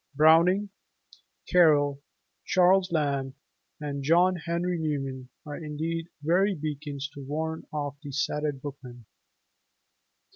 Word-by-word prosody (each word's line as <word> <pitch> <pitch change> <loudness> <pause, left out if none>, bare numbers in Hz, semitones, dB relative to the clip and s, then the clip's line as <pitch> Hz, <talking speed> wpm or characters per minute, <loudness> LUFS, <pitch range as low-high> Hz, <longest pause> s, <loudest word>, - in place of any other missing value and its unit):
Browning, 170 +7 +5 0.8
Carlyle, 145 -5 +4 0.4
Charles 185 0 +3
Lamb, 140 -4 -1 0.4
and 145 -2 -4
John 175 +6 +4
Henry 170 +1 -2
Newman 135 -4 -3 0.2
are 145 -1 -6
indeed 160 +2 -3 0.2
very 185 +5 +2
beacons 145 -2 -4
to 140 - -9
warn 160 +3 -4
off 145 -2 -4
the 145 -3 -8
sated 150 0 -2
bookman. 125 -5 -9
150 Hz, 105 wpm, -27 LUFS, 140-170 Hz, 0.8 s, Browning